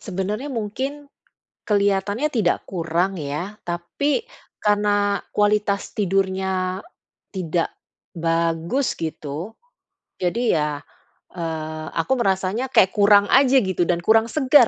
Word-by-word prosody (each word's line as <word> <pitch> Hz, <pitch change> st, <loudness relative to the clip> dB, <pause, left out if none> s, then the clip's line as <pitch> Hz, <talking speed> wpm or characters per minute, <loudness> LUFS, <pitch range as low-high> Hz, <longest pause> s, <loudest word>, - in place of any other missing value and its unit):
sebenernya 205 Hz, +8 st, -3 dB
mungkin 265 Hz, +5 st, -4 dB, 0.6 s
kelihatannya 205 Hz, +5 st, +1 dB
tidak 210 Hz, -8 st, +1 dB
kurang 175 Hz, +2 st, -1 dB
ya, 160 Hz, +7 st, -4 dB
tapi 175 Hz, -, -1 dB, 0.4 s
karena 205 Hz, -1 st, +2 dB
kualitas 205 Hz, -1 st, +1 dB
tidurnya 190 Hz, -1 st, 0 dB, 0.5 s
tidak 175 Hz, -3 st, -1 dB, 0.5 s
bagus 165 Hz, +8 st, 0 dB
gitu. 160 Hz, +4 st, -5 dB, 0.7 s
Jadi 225 Hz, +7 st, +1 dB
ya, 150 Hz, -1 st, -1 dB, 0.5 s
eee, 155 Hz, -2 st, -4 dB
aku 165 Hz, +10 st, +1 dB
merasanya 195 Hz, +3 st, 0 dB
kayak 190 Hz, -7 st, +5 dB
kurang 205 Hz, 0 st, +6 dB
aja 270 Hz, 0 st, +5 dB
gitu 185 Hz, -4 st, 0 dB
dan 175 Hz, -1 st, +1 dB
kurang 225 Hz, +3 st, +4 dB
segar 270 Hz, -4 st, +5 dB
195 Hz, 100 wpm, -22 LUFS, 170-215 Hz, 0.7 s, kurang